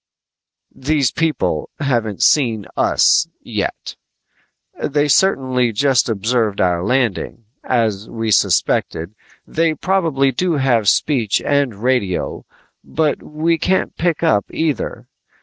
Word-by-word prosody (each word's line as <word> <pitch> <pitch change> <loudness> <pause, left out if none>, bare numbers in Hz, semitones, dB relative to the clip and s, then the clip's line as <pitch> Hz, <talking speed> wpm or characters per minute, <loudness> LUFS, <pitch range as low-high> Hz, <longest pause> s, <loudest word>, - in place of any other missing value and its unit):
"These 140 -1 0
people 165 -1 -1
haven't 120 -8 -1
seen 115 -9 +2
us - - +3
yet. - - -4 0.9
They 145 +1 0
certainly 130 -7 +2
just 130 +3 +2
observed 110 0 0
our 90 -1 +1
landing. 120 -1 -1 0.2
As 110 -4 -1
we 115 -1 -3
suspected, 85 -2 +1 0.3
they 165 -1 0
probably 160 -6 +1
do 175 +7 -1
have 125 -7 +2
speech 120 -9 +1
and 135 -7 0
radio 125 -8 -1 0.4
but 155 -2 -1
we 160 +2 -1
can't 185 +4 0
pick 170 -1 -1
up 130 -12 +2
either. 155 -6 -3
130 Hz, 110 wpm, -18 LUFS, 110-155 Hz, 0.9 s, us